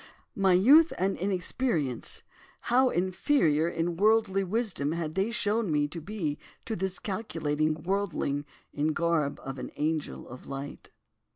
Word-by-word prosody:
My 195 Hz, -4 st, +3 dB
youth 285 Hz, -, +7 dB
and 195 Hz, +2 st, +1 dB
inexperience, 180 Hz, -, -1 dB, 0.5 s
how 260 Hz, +1 st, +5 dB
inferior 175 Hz, -, +2 dB
in 170 Hz, 0 st, -2 dB
worldly 210 Hz, -1 st, +3 dB
wisdom 190 Hz, -7 st, -1 dB
had 165 Hz, -2 st, -3 dB
they 195 Hz, +5 st, 0 dB
shown 225 Hz, -4 st, 0 dB
me 145 Hz, -1 st, +2 dB
to 165 Hz, +2 st, -6 dB
be 165 Hz, -5 st, -3 dB, 0.3 s
to 225 Hz, -, -2 dB
this 190 Hz, -1 st, -2 dB
calculating 155 Hz, -7 st, -1 dB
worldling 175 Hz, -7 st, -1 dB, 0.3 s
in 150 Hz, +1 st, 0 dB
the 155 Hz, -, +1 dB
garb 165 Hz, -4 st, 0 dB
of 135 Hz, 0 st, -6 dB
an -, -, -5 dB
angel 155 Hz, 0 st, -2 dB
of 125 Hz, +1 st, -11 dB
light. 140 Hz, +1 st, -7 dB
175 Hz, 145 wpm, -28 LUFS, 155-205 Hz, 0.5 s, youth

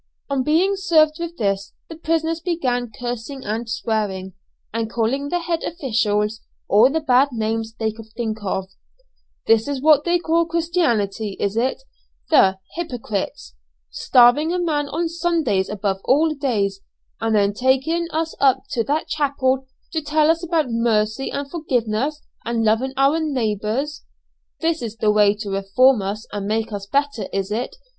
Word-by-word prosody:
On 275 Hz, -1 st, +1 dB
being 335 Hz, +8 st, +2 dB
served 315 Hz, -5 st, +3 dB
with 340 Hz, 0 st, -5 dB
this, 200 Hz, -2 st, -1 dB
the 325 Hz, -, -9 dB
prisoners 325 Hz, 0 st, -1 dB
began 255 Hz, -9 st, -1 dB
cursing 245 Hz, +4 st, -6 dB
and 225 Hz, +2 st, -3 dB
swearing, 205 Hz, -5 st, -2 dB, 0.4 s
and 225 Hz, -1 st, -2 dB
calling 240 Hz, +5 st, -1 dB
the 355 Hz, -, 0 dB
head 335 Hz, -1 st, -2 dB
officials 220 Hz, -8 st, -1 dB, 0.3 s
all 220 Hz, +6 st, +6 dB
the 320 Hz, +3 st, 0 dB
bad 265 Hz, -1 st, +4 dB
names 225 Hz, -1 st, -2 dB
they 220 Hz, -1 st, -1 dB
could 220 Hz, 0 st, -12 dB
think 220 Hz, -2 st, -2 dB
of: 190 Hz, -1 st, -2 dB, 0.8 s
"This 225 Hz, +1 st, +3 dB
is 285 Hz, -2 st, -2 dB
what 295 Hz, 0 st, +5 dB
they 345 Hz, +1 st, +2 dB
call 335 Hz, 0 st, +1 dB
Christianity, 240 Hz, -, 0 dB
is 200 Hz, +1 st, -1 dB
it, 255 Hz, -, 0 dB, 0.5 s
the 190 Hz, -11 st, +5 dB, 0.2 s
hypocrites? 220 Hz, -, -4 dB, 0.4 s
Starving 245 Hz, -, +4 dB
a 360 Hz, -, 0 dB
man 300 Hz, -5 st, -1 dB
on 330 Hz, +4 st, -1 dB
Sundays 330 Hz, -, 0 dB
above 195 Hz, -2 st, -2 dB
all 305 Hz, +4 st, +3 dB
days, 215 Hz, -9 st, -1 dB, 0.4 s
and 225 Hz, -1 st, 0 dB
then 200 Hz, -1 st, +3 dB
taking 265 Hz, +9 st, +1 dB
us 320 Hz, 0 st, -2 dB
up 270 Hz, -2 st, +3 dB
to 230 Hz, -, 0 dB
that 300 Hz, +3 st, -1 dB
chapel 270 Hz, -3 st, 0 dB, 0.2 s
to 320 Hz, -1 st, -1 dB
tell 305 Hz, +1 st, +3 dB
us 335 Hz, +1 st, -2 dB
about 330 Hz, -2 st, +1 dB
mercy 230 Hz, +1 st, +1 dB
and 280 Hz, 0 st, -3 dB
forgiveness 275 Hz, -2 st, -1 dB, 0.2 s
and 230 Hz, -1 st, -1 dB
loving 230 Hz, +5 st, +1 dB
our 275 Hz, +4 st, +3 dB
neighbours! 260 Hz, 0 st, -2 dB, 0.6 s
This 330 Hz, 0 st, 0 dB
is 225 Hz, -2 st, -5 dB
the 215 Hz, -1 st, +2 dB
way 210 Hz, -1 st, +4 dB
to 210 Hz, -1 st, -6 dB
reform 200 Hz, +5 st, +3 dB
us 205 Hz, +3 st, -4 dB
and 200 Hz, -1 st, -3 dB
make 220 Hz, +1 st, -1 dB
us 200 Hz, -1 st, -5 dB
better, 280 Hz, 0 st, 0 dB
is 195 Hz, 0 st, -2 dB
it? 235 Hz, +4 st, -3 dB
250 Hz, 160 wpm, -21 LUFS, 215-310 Hz, 0.8 s, all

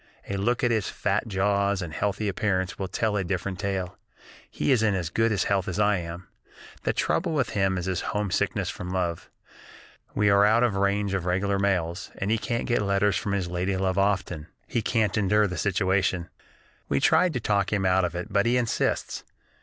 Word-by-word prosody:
A 100 Hz, -, -3 dB
look 120 Hz, +7 st, 0 dB
at 120 Hz, -, +3 dB
his 110 Hz, -4 st, 0 dB
fat 105 Hz, +3 st, -1 dB
jaws 100 Hz, 0 st, +1 dB
and 80 Hz, -2 st, -7 dB
healthy 105 Hz, +3 st, -1 dB
appearance 95 Hz, 0 st, -1 dB
will 95 Hz, -, -2 dB
tell 110 Hz, +2 st, -1 dB
a 100 Hz, -, 0 dB
different 90 Hz, +1 st, -3 dB
tale. 95 Hz, -3 st, -3 dB, 0.5 s
He -, -, -1 dB
is 125 Hz, -4 st, +4 dB
in 105 Hz, -3 st, +2 dB
as 85 Hz, -3 st, -3 dB
good 115 Hz, +4 st, +2 dB
health 100 Hz, -2 st, 0 dB
as 90 Hz, -, -3 dB
I 105 Hz, -1 st, +3 dB
am. 85 Hz, +1 st, -7 dB, 0.5 s
The -, -, 0 dB
trouble 170 Hz, -1 st, 0 dB
with 140 Hz, -7 st, 0 dB
him 95 Hz, -2 st, +1 dB
is 90 Hz, +1 st, -2 dB
homesickness 105 Hz, -3 st, -1 dB
from 90 Hz, -, -7 dB
love. 90 Hz, -3 st, -2 dB, 0.9 s
We 105 Hz, 0 st, +2 dB
are 100 Hz, 0 st, +5 dB
out 110 Hz, +3 st, +4 dB
of 120 Hz, -4 st, +2 dB
the 95 Hz, -, -2 dB
range 100 Hz, 0 st, +1 dB
of 95 Hz, -3 st, -1 dB
regular 100 Hz, +2 st, +1 dB
mails, 90 Hz, -3 st, -1 dB
and 100 Hz, +2 st, -1 dB
he 115 Hz, -, +2 dB
can't 115 Hz, +1 st, -2 dB
get 120 Hz, -3 st, +1 dB
letters 100 Hz, -1 st, +2 dB
from 100 Hz, -, -2 dB
his 95 Hz, -3 st, -1 dB
lady 90 Hz, +2 st, -1 dB
love 95 Hz, 0 st, 0 dB
often. 95 Hz, -6 st, 0 dB, 0.2 s
He 120 Hz, -, -1 dB
can't 110 Hz, -3 st, +1 dB
endure 105 Hz, +1 st, +3 dB
the 90 Hz, -3 st, -3 dB
situation. 95 Hz, -1 st, 0 dB, 0.6 s
We 70 Hz, -, +2 dB
tried 165 Hz, -, +4 dB
to 125 Hz, -, -1 dB
talk 100 Hz, -3 st, 0 dB
him 100 Hz, -2 st, 0 dB
out 95 Hz, 0 st, +3 dB
of 85 Hz, -1 st, -2 dB
it, 95 Hz, +4 st, -5 dB
but 100 Hz, +3 st, +3 dB
he 125 Hz, +1 st, +3 dB
insists. 120 Hz, -2 st, -1 dB
100 Hz, 200 wpm, -26 LUFS, 95-105 Hz, 0.9 s, are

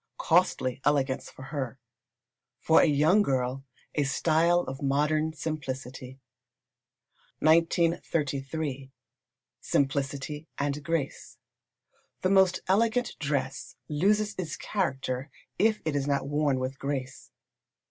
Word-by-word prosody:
Costly 160 Hz, -7 st, +2 dB
elegance 140 Hz, -3 st, +1 dB
for 130 Hz, -, -12 dB
her 130 Hz, -4 st, -3 dB, 0.8 s
for 160 Hz, -, +5 dB
a -, -, +4 dB
young 155 Hz, +7 st, +4 dB
girl, 130 Hz, -5 st, -1 dB, 0.3 s
a 150 Hz, -, +1 dB
style 165 Hz, +5 st, +3 dB
of 135 Hz, -4 st, -7 dB
modern 150 Hz, +3 st, +1 dB
simplicity. 130 Hz, -4 st, -5 dB, 1.2 s
1933. 155 Hz, -4 st, +1 dB, 0.7 s
Simplicity 140 Hz, +2 st, -1 dB
and 145 Hz, +1 st, -2 dB
Grace. 165 Hz, -3 st, -3 dB, 0.9 s
The 185 Hz, -, +2 dB
most 190 Hz, -2 st, +4 dB
elegant 230 Hz, +5 st, +2 dB
dress 140 Hz, -3 st, -2 dB
loses 205 Hz, +8 st, +1 dB
its 165 Hz, -5 st, -3 dB
character 135 Hz, -7 st, -2 dB, 0.3 s
if 220 Hz, 0 st, +2 dB
it 155 Hz, -2 st, -1 dB
is 140 Hz, 0 st, 0 dB
not 140 Hz, -1 st, 0 dB
worn 145 Hz, -2 st, +1 dB
with 130 Hz, +1 st, -4 dB
grace. 135 Hz, -2 st, -4 dB
145 Hz, 105 wpm, -28 LUFS, 135-165 Hz, 1.2 s, for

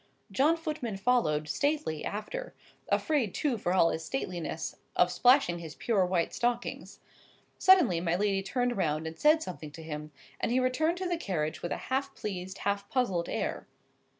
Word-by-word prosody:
John 305 Hz, +5 st, +3 dB
Footman 305 Hz, -, -4 dB
followed, 195 Hz, -9 st, +2 dB
stately, 285 Hz, -, -1 dB
after; -, -, -5 dB, 0.3 s
afraid 280 Hz, -, +1 dB
too, 265 Hz, -7 st, 0 dB
for 175 Hz, -, -1 dB
all 180 Hz, -3 st, +4 dB
his 160 Hz, -, -3 dB
stateliness, 175 Hz, -, -4 dB, 0.2 s
of 180 Hz, 0 st, +4 dB
splashing 180 Hz, -2 st, +4 dB
his 160 Hz, -2 st, -8 dB
pure 215 Hz, -5 st, +1 dB
white 180 Hz, -2 st, 0 dB
stockings. 240 Hz, 0 st, -2 dB, 0.6 s
Suddenly 335 Hz, -, +5 dB
my 170 Hz, -1 st, +1 dB
lady 195 Hz, 0 st, +1 dB
turned 245 Hz, +4 st, -1 dB
round 155 Hz, -3 st, 0 dB
and 160 Hz, 0 st, -6 dB
said 310 Hz, +1 st, +5 dB
something 160 Hz, -4 st, -7 dB
to 160 Hz, -, -9 dB
him, 150 Hz, -1 st, -6 dB, 0.3 s
and -, -, 0 dB
he 250 Hz, -, +3 dB
returned 310 Hz, +7 st, +1 dB
to 370 Hz, 0 st, -2 dB
the 350 Hz, -1 st, 0 dB
carriage 155 Hz, -, -2 dB
with 175 Hz, -, -4 dB
a -, -, -1 dB
half 275 Hz, +1 st, 0 dB
pleased, 190 Hz, -2 st, -5 dB
half 200 Hz, 0 st, -2 dB
puzzled 195 Hz, -10 st, 0 dB
air. -, -, -3 dB
200 Hz, 170 wpm, -30 LUFS, 170-270 Hz, 0.6 s, Suddenly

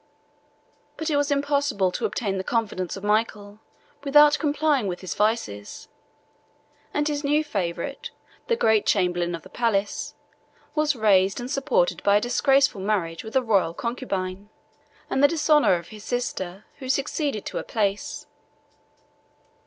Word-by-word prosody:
But 320 Hz, 0 st, -2 dB
it -, -, +2 dB
was 285 Hz, +1 st, +1 dB
impossible 280 Hz, -9 st, +1 dB
to -, -, -3 dB
obtain 195 Hz, -4 st, -2 dB
the -, -, -3 dB
confidence 200 Hz, -5 st, -2 dB
of 195 Hz, -, -10 dB
Michael, 210 Hz, -1 st, -1 dB, 0.4 s
without 295 Hz, +1 st, +6 dB
complying 295 Hz, -5 st, +1 dB
with 180 Hz, -1 st, -4 dB
his 185 Hz, -5 st, -4 dB
vices; 210 Hz, -, -2 dB, 1.0 s
and 295 Hz, 0 st, 0 dB
his 295 Hz, -1 st, -2 dB
new 295 Hz, +2 st, +2 dB
favorite, 205 Hz, -, -4 dB, 0.4 s
the 465 Hz, -, +2 dB
great 220 Hz, -, +2 dB
chamberlain 175 Hz, -3 st, +1 dB
of 165 Hz, -, -10 dB
the 185 Hz, -, -13 dB
palace, 210 Hz, -2 st, -1 dB, 0.6 s
was 305 Hz, -1 st, +1 dB
raised 195 Hz, -3 st, +3 dB
and 245 Hz, +2 st, -5 dB
supported 460 Hz, -, +1 dB
by 200 Hz, 0 st, +3 dB
a -, -, +5 dB
disgraceful 270 Hz, -2 st, +2 dB
marriage 190 Hz, -5 st, -1 dB
with 220 Hz, +2 st, -9 dB
a 260 Hz, -, +3 dB
royal 195 Hz, -7 st, +1 dB
concubine, 200 Hz, -5 st, -4 dB, 0.6 s
and 265 Hz, -, 0 dB
the -, -, +9 dB
dishonor 300 Hz, -, +3 dB
of 170 Hz, -1 st, -6 dB
his 215 Hz, -1 st, -11 dB
sister, 200 Hz, -6 st, -4 dB
who 260 Hz, -2 st, -7 dB
succeeded 275 Hz, -3 st, -1 dB
to -, -, -4 dB
her -, -, -3 dB
place. 205 Hz, -2 st, -2 dB
220 Hz, 145 wpm, -24 LUFS, 195-285 Hz, 1.0 s, the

